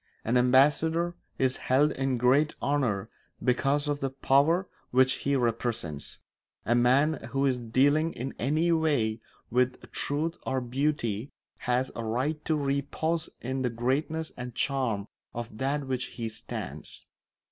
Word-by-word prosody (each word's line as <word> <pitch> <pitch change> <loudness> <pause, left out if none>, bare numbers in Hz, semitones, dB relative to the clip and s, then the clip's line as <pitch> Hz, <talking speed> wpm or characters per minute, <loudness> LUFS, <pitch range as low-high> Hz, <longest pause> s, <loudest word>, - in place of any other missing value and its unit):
An 115 - +1
ambassador 150 +7 +4 0.2
is 130 0 +1
held 145 +4 +3
in 135 -2 -1
great 135 +5 +3
honour 125 -9 0 0.4
because 135 +3 +2
of 145 -1 0
the 135 - -1
power 140 +7 +3 0.2
which 130 +1 +4 0.2
he 140 - +3
represents; 115 - -2 0.5
a 120 - +3
man 130 +6 +3
who 135 0 +2
is 130 -2 +1
dealing 145 +7 +2
in 130 +3 -5
any 155 +7 +2
way 140 -10 +1 0.3
with 125 +1 +2
truth 155 +4 -1
or 130 0 0
beauty 125 -2 -1 0.4
has 125 +1 +1
a 115 - -4
right 130 +8 -1
to 160 - +2
repose 145 +3 -1
in 130 +2 -2
the 125 - +1
greatness 140 +7 -1
and 125 -1 -7
charm 125 -8 0 0.3
of 115 -2 -5
that 140 +2 0
for - - -7
which 130 -1 -2
he 115 -2 -5
stands. 110 -1 -6
130 Hz, 145 wpm, -28 LUFS, 120-145 Hz, 0.5 s, ambassador